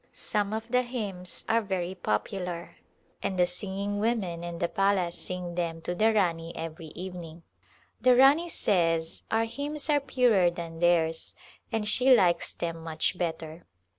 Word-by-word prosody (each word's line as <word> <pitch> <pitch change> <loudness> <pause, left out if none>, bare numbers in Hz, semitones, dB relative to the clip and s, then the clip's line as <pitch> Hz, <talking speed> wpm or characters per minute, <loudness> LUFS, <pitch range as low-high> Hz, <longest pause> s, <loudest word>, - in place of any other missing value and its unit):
Some 205 -1 -1
of 220 +1 -3
the 250 +1 +3
hymns 205 -8 -5
are 230 +1 +3
very 190 -3 -2
popular 175 - -3 0.4
and 190 - -2
the 180 - +5
singing 195 +3 -3
women 205 -7 -1
of 170 -1 -5
the 170 - +1
palace 195 -3 +1
sing 180 -1 -5
them 170 -2 -2
to 175 - -3
the 215 +5 +3
Rani 170 -5 0
every 165 0 -6
evening. 175 -2 -8 0.6
The 250 +1 +6
Rani 280 +7 +5
says 165 - +1
our 225 +1 +2
hymns 290 +5 -3
are 290 - +4
purer 245 -9 +3
than 170 -1 -7
theirs 165 -2 +2 0.4
and 220 -2 -1
she 255 +4 +5
likes 175 -6 +2
them 165 -1 -4
much 160 +2 -1
better. 165 -1 -4
180 Hz, 155 wpm, -28 LUFS, 170-220 Hz, 0.6 s, The